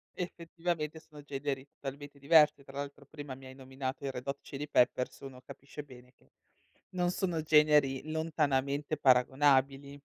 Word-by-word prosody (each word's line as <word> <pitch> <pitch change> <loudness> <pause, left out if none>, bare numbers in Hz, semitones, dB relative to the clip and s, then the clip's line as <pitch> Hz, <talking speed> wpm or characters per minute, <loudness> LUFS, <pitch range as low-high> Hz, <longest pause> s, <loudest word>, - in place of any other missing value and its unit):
Effettivamente 170 -2 -4
sono 150 -2 -14
generi 140 -1 -4
totalmente 140 +1 -9
diversi. 150 -1 +5
Tra 135 +1 -11
l'altro, 140 0 -6
prima, 145 -2 -8
mi 135 0 -14
hai 130 0 -11
nominato 130 +1 -5
i 135 - -1
Red 125 +1 -8
Hot 140 0 -3
Chili 145 +2 -6
Peppers, 125 -2 +2
uno 130 -2 -10
capisce 140 +3 -10
bene 125 -2 -15
che - - -30 0.6
non 180 -1 0
sono 175 -4 -1
generi 150 -2 +4
lontanamente 150 -2 0
paragonabili. 135 +1 +3
140 Hz, 150 wpm, -32 LUFS, 135-150 Hz, 0.6 s, diversi